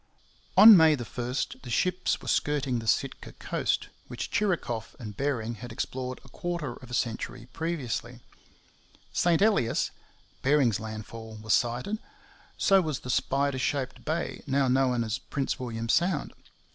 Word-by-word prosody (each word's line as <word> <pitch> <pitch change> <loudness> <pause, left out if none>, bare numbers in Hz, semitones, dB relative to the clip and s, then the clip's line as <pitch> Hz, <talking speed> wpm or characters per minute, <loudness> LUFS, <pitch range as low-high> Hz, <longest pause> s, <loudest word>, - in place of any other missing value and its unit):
On 220 -1 +12
May 160 -3 +6
1 120 +1 -5 0.3
the 125 - -9
ships 180 +9 +1
were - - -9
skirting 140 -4 +1
the 115 - -7
Sitka - - -1
coast, - - -1 0.2
which - - -5
Chirikoff 165 - -1
and 105 -4 -8
Bering 120 -3 -2
had 120 -1 -7
explored 130 +2 -4
a - - -15
quarter 170 -3 -3
of 125 0 -13
a - - -8
century 120 0 -3
previously. 130 -7 -3 0.9
St 175 +2 +3
Elias, 200 - +2 0.5
Bering's 135 -6 +3
landfall, 110 +1 -7
was 110 -1 0
sighted. 125 - 0 0.6
So 195 -1 +5
was 155 -6 -3
the 125 - -3
spider 140 +1 +1
shaped 130 -1 -2
bay 160 +2 -2
now 135 0 +2
known 125 -2 +2
as 110 +1 -2
Prince 140 -1 -3
William 115 -2 -4
Sound. 170 +4 +1
130 Hz, 145 wpm, -28 LUFS, 115-155 Hz, 0.9 s, On